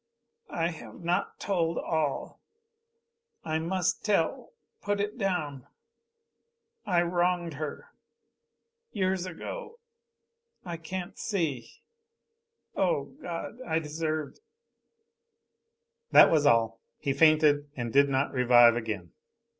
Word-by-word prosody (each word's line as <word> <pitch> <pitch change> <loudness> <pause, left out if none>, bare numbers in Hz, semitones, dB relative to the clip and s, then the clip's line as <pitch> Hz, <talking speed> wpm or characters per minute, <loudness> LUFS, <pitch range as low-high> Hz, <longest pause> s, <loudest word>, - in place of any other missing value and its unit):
"I 165 0 -1
have 120 -6 -10
not 175 +1 -1
told 170 -4 0
all. 155 -4 -2 1.0
I 160 0 -1
must 180 +2 -1
tell 205 - 0 0.3
put 205 0 -1
it 205 +1 -2
down 155 - -2 1.2
I 175 -2 +3
wronged 175 -1 0
her. 150 +1 -6 1.0
Years 185 -2 -1
ago 460 - -7 0.9
I 170 -2 -5
can't 175 +2 -6
see 155 - -3 0.9
O - - 0
God 175 - -6
I 160 -11 -1
deserved 155 -1 -3 0.9
" 465 +1 -53
That - - +9
was 150 -3 +4
all. 115 -3 +3 0.2
He 140 - -1
fainted 150 -2 +4
and 120 -3 -4
did 140 +1 +5
not 135 +1 0
revive 120 -2 +6
again. 105 -8 -4
165 Hz, 105 wpm, -28 LUFS, 140-185 Hz, 1.2 s, That